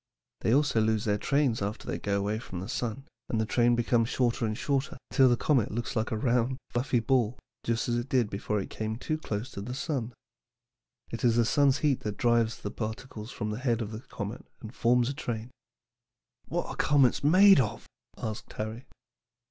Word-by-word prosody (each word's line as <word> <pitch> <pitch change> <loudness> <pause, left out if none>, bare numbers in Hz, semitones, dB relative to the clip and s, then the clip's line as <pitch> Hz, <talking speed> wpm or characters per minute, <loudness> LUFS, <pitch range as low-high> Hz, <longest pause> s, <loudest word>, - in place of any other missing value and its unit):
They - - +1
also 140 -3 +3
lose 110 -1 +1
their 105 -1 +1
trains 140 -4 +1
after 100 +3 -3
they - - -3
go 100 -1 0
away 105 +2 -1
from 95 -6 -7
the 95 - -6
sun, 125 +1 -3 0.2
and 115 - 0
the 110 - +1
train 120 +3 +3
becomes 120 0 +2
shorter 120 -2 +1
and 110 0 -3
shorter, 140 -2 -1
till 130 -1 +5
the 120 - +3
comet 130 -6 +2
looks 115 +3 -4
like 110 -1 0
a 110 - -1
round, 125 +2 +1
fluffy 125 0 +1
ball, 120 -1 +1 0.3
just 115 -1 0
as 120 -1 +1
it 120 +2 -3
did 125 -6 +2
before 105 +1 -2
it 95 - -6
came 110 0 -3
too 155 +6 -3
near 105 -1 0 0.2
the 125 +5 -5
sun. 130 -4 -3 1.0
It 115 - -5
is 120 -2 +4
the 120 -1 +4
sun's 140 +2 +3
heat 145 -4 +1
that 105 -1 -4
drives 115 -1 +2
the 100 - -3
particles 110 0 -6
from 105 -1 -3
the 105 - -4
head 120 -4 +1
of 110 -2 -4
the 110 - -5
comet 105 -2 -6 0.2
and 110 0 -9
forms 120 -1 +3
a 140 - -1
train." 120 -3 -5 1.0
"What - - -2
are - - -6
comets 140 -3 +3
made 185 +5 +7
of?" 110 -4 -1 0.3
asked 110 -1 -5
Harry. 110 +4 -5
115 Hz, 200 wpm, -29 LUFS, 110-130 Hz, 1.0 s, made